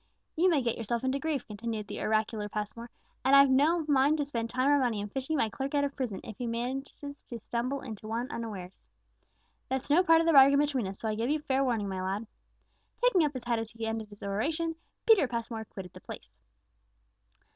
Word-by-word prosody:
You 360 Hz, +3 st, +4 dB
may 300 Hz, -7 st, +2 dB
get 235 Hz, -1 st, -1 dB
yourself 230 Hz, +2 st, -2 dB
into 260 Hz, +1 st, 0 dB
grief," 295 Hz, -3 st, -2 dB
continued 220 Hz, 0 st, -5 dB
the -, -, -6 dB
oracular 215 Hz, -1 st, 0 dB
Passmore; 215 Hz, +3 st, -5 dB, 0.3 s
"and 265 Hz, +2 st, +5 dB
I've 275 Hz, -1 st, +7 dB
no 310 Hz, +5 st, +3 dB
mind 285 Hz, +1 st, +4 dB
to 290 Hz, -, 0 dB
spend 230 Hz, -5 st, -3 dB
time 255 Hz, +3 st, 0 dB
or 290 Hz, 0 st, +5 dB
money 240 Hz, -5 st, 0 dB
in 205 Hz, 0 st, -4 dB
fishing 270 Hz, +7 st, -2 dB
my 225 Hz, -, +2 dB
clerk 270 Hz, +6 st, -4 dB
out 285 Hz, -, +3 dB
of 280 Hz, 0 st, -2 dB
prison, 245 Hz, -8 st, -3 dB
if 215 Hz, -, -9 dB
he 245 Hz, -, -2 dB
manage 250 Hz, +4 st, -3 dB
to 285 Hz, -4 st, -8 dB
stumble 245 Hz, +5 st, -2 dB
into 220 Hz, -5 st, -8 dB
one 235 Hz, +5 st, -3 dB
unawares. 205 Hz, -7 st, -6 dB, 1.0 s
That's 265 Hz, +2 st, -2 dB
no 330 Hz, +5 st, +6 dB
part 330 Hz, -3 st, +5 dB
of 330 Hz, -, +1 dB
the 330 Hz, -, +4 dB
bargain 275 Hz, 0 st, +8 dB
between 280 Hz, -7 st, +1 dB
us; 195 Hz, +1 st, -6 dB
so 225 Hz, -, -2 dB
I 215 Hz, -, 0 dB
give 225 Hz, +4 st, -1 dB
you 305 Hz, 0 st, +1 dB
fair 270 Hz, -1 st, +1 dB
warning, 230 Hz, -6 st, 0 dB
my 190 Hz, -1 st, -3 dB
lad." 195 Hz, +4 st, -2 dB, 0.8 s
Taking 400 Hz, -9 st, +5 dB
up 295 Hz, -1 st, 0 dB
his 255 Hz, -2 st, -6 dB
hat 235 Hz, -1 st, 0 dB
as 225 Hz, -1 st, -4 dB
he 225 Hz, 0 st, -6 dB
ended 225 Hz, -1 st, -3 dB
his 205 Hz, -1 st, -13 dB
oration, 310 Hz, -, -1 dB, 0.3 s
Peter 430 Hz, -, +6 dB
Passmore 230 Hz, -2 st, -4 dB
quitted 190 Hz, -4 st, -9 dB
the -, -, -12 dB
place. -, -, -10 dB
245 Hz, 220 wpm, -30 LUFS, 220-280 Hz, 1.0 s, bargain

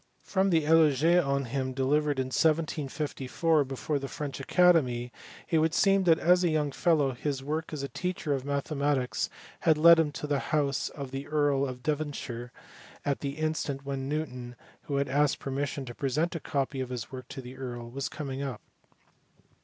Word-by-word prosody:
From 195 Hz, 0 st, +1 dB
the 165 Hz, -4 st, +2 dB
eloye 165 Hz, +2 st, +5 dB
on 140 Hz, -1 st, 0 dB
him 130 Hz, +1 st, -2 dB
de 130 Hz, 0 st, -1 dB
livered 150 Hz, +1 st, +2 dB
in 130 Hz, -1 st, -2 dB
1754 155 Hz, -1 st, +1 dB
before 135 Hz, +2 st, -2 dB
the 135 Hz, -, -5 dB
French 140 Hz, -2 st, -5 dB
Academy 135 Hz, -7 st, +3 dB, 0.4 s
it 165 Hz, -3 st, +2 dB
would 160 Hz, +1 st, +1 dB
seem 195 Hz, -1 st, +4 dB
that 165 Hz, -2 st, +6 dB
as 180 Hz, +2 st, +4 dB
a 175 Hz, -, +3 dB
young 150 Hz, -2 st, 0 dB
fellow 150 Hz, -3 st, +2 dB
his 135 Hz, +2 st, -3 dB
work 155 Hz, +3 st, -3 dB
as 150 Hz, -3 st, -4 dB
a -, -, -2 dB
teacher 170 Hz, +2 st, -2 dB
of 135 Hz, -, -1 dB
mathe 140 Hz, +2 st, -2 dB
matics 140 Hz, -3 st, 0 dB, 0.3 s
had 160 Hz, -2 st, +3 dB
led 170 Hz, +1 st, +8 dB
him 155 Hz, -2 st, +2 dB
to -, -, -5 dB
the 145 Hz, -2 st, 0 dB
house 140 Hz, -1 st, 0 dB
of 140 Hz, -3 st, -7 dB
the 135 Hz, +1 st, -5 dB
Earl 145 Hz, -2 st, +2 dB
of 125 Hz, -1 st, -7 dB
Devonshire 140 Hz, -5 st, -3 dB, 0.5 s
at 140 Hz, -1 st, 0 dB
the 140 Hz, 0 st, -4 dB
instant 155 Hz, -3 st, -2 dB
when 135 Hz, -1 st, -3 dB
Newton, 125 Hz, -5 st, -4 dB, 0.3 s
who 140 Hz, -, -3 dB
had 140 Hz, 0 st, +1 dB
asked 145 Hz, +2 st, +2 dB
permission 140 Hz, 0 st, -3 dB
to 120 Hz, -, -7 dB
present 145 Hz, +7 st, -1 dB
a 165 Hz, -, -3 dB
copy 135 Hz, -2 st, -2 dB
of 130 Hz, -, -4 dB
his 125 Hz, -3 st, -5 dB
work 130 Hz, -1 st, -8 dB
to -, -, -8 dB
the 125 Hz, 0 st, -9 dB
earl, 120 Hz, -3 st, -6 dB
was 135 Hz, +1 st, -3 dB
coming 140 Hz, -3 st, -5 dB
out. 135 Hz, -5 st, -4 dB
140 Hz, 190 wpm, -29 LUFS, 135-155 Hz, 0.5 s, led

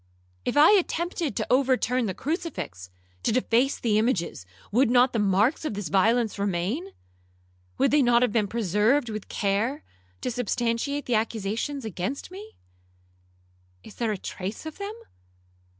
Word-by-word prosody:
If -, -, -1 dB
I 300 Hz, +5 st, +8 dB
attempted 345 Hz, -, 0 dB
to -, -, -2 dB
overturn 255 Hz, -2 st, +2 dB
the 190 Hz, -, -3 dB
crucifix, 185 Hz, -, -4 dB, 0.3 s
to -, -, +1 dB
deface 255 Hz, +3 st, +2 dB
the 215 Hz, -3 st, +2 dB
images, 185 Hz, -, -1 dB, 0.2 s
would 245 Hz, +4 st, +3 dB
not 250 Hz, +1 st, +4 dB
the 230 Hz, -, 0 dB
marks 210 Hz, +9 st, +2 dB
of 305 Hz, -9 st, -3 dB
this 200 Hz, -5 st, -4 dB
violence 220 Hz, +4 st, +2 dB
remain? 200 Hz, -, -1 dB, 0.9 s
Would -, -, +3 dB
they 295 Hz, 0 st, +5 dB
not 240 Hz, -1 st, +4 dB
have 245 Hz, -, +2 dB
been 210 Hz, -2 st, +1 dB
preserved 225 Hz, -, +1 dB
with 215 Hz, -2 st, -6 dB
care, 220 Hz, +8 st, -1 dB, 0.4 s
to -, -, -2 dB
substantiate 245 Hz, +4 st, -1 dB
the 245 Hz, -, -1 dB
accusation 225 Hz, +5 st, -1 dB
against 220 Hz, -, -4 dB
me? 415 Hz, +4 st, -10 dB, 1.3 s
Is 215 Hz, -, -12 dB
there 230 Hz, -2 st, -1 dB
a 210 Hz, -, -2 dB
trace 190 Hz, +7 st, -6 dB
of 315 Hz, +3 st, -8 dB
them? 405 Hz, +2 st, -5 dB
235 Hz, 150 wpm, -26 LUFS, 205-275 Hz, 1.3 s, I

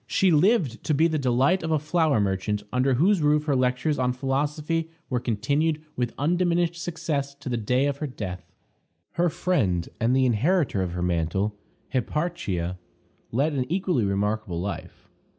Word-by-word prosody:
She 190 Hz, -2 st, +3 dB
lived 160 Hz, -, +3 dB
to 155 Hz, -, +2 dB
be 160 Hz, +4 st, +4 dB
the 155 Hz, -2 st, -1 dB
delight 135 Hz, +7 st, +2 dB
of 165 Hz, -, -3 dB
a 160 Hz, -, +3 dB
flour 155 Hz, -3 st, +1 dB
merchant, 100 Hz, +1 st, -1 dB
under 130 Hz, +1 st, +2 dB
whose 180 Hz, +7 st, +3 dB
roof 150 Hz, 0 st, +3 dB
her 145 Hz, -3 st, +1 dB
lectures 130 Hz, +4 st, +1 dB
on 125 Hz, -1 st, +1 dB
philosophy 150 Hz, +5 st, -1 dB, 0.2 s
were 125 Hz, -, +1 dB
continued 145 Hz, +8 st, 0 dB, 0.2 s
with 120 Hz, -1 st, -2 dB
undiminished 175 Hz, +2 st, +1 dB
success 155 Hz, -5 st, -3 dB
to 140 Hz, -, -7 dB
the 120 Hz, -, 0 dB
day 125 Hz, +5 st, +1 dB
of 140 Hz, -1 st, -1 dB
her 150 Hz, -, -3 dB
death. 95 Hz, -8 st, -7 dB, 0.6 s
Her 175 Hz, 0 st, +1 dB
friend, 105 Hz, -, 0 dB
and 120 Hz, +2 st, +2 dB
the 130 Hz, 0 st, +4 dB
inheritor 130 Hz, -, +2 dB
of 90 Hz, -2 st, -2 dB
her 90 Hz, 0 st, -2 dB
mantle, 90 Hz, +4 st, 0 dB, 0.4 s
Hipparchia, 120 Hz, -, -2 dB, 0.5 s
led 140 Hz, +6 st, +1 dB
an 130 Hz, +1 st, -2 dB
equally 180 Hz, -, +1 dB
remarkable 100 Hz, -2 st, -1 dB
life. 100 Hz, +3 st, -6 dB
135 Hz, 165 wpm, -25 LUFS, 110-160 Hz, 0.6 s, be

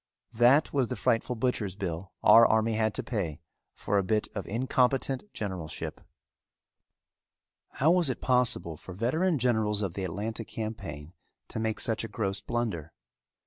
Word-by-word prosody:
That 130 Hz, +6 st, +4 dB
was 135 Hz, -4 st, +2 dB
the -, -, -3 dB
frightful 115 Hz, +2 st, +1 dB
butchers' 110 Hz, -5 st, -1 dB
bill 95 Hz, -2 st, -4 dB
our 115 Hz, -, +9 dB
army 110 Hz, 0 st, +3 dB
had 110 Hz, -1 st, 0 dB
to -, -, -2 dB
pay 95 Hz, -, -3 dB, 0.4 s
for 100 Hz, 0 st, 0 dB
a -, -, 0 dB
bit 105 Hz, +3 st, 0 dB
of 100 Hz, -, -5 dB
incompetent 130 Hz, -, 0 dB
generalship. 90 Hz, -6 st, -5 dB, 1.7 s
How 155 Hz, +5 st, +3 dB
was 175 Hz, -5 st, +3 dB
it 130 Hz, -, -2 dB
possible 125 Hz, -10 st, +1 dB
for 90 Hz, -, -10 dB
veteran 155 Hz, -, +1 dB
generals 110 Hz, -4 st, +1 dB
of 95 Hz, -4 st, -2 dB
the 95 Hz, -, -4 dB
Atlanta 105 Hz, +6 st, -3 dB
campaign 100 Hz, -9 st, -6 dB, 0.4 s
to -, -, -4 dB
make 110 Hz, -1 st, -1 dB
such 115 Hz, +2 st, 0 dB
a -, -, -3 dB
gross 100 Hz, -2 st, -2 dB
blunder? 100 Hz, -10 st, -3 dB
110 Hz, 150 wpm, -29 LUFS, 95-125 Hz, 1.7 s, our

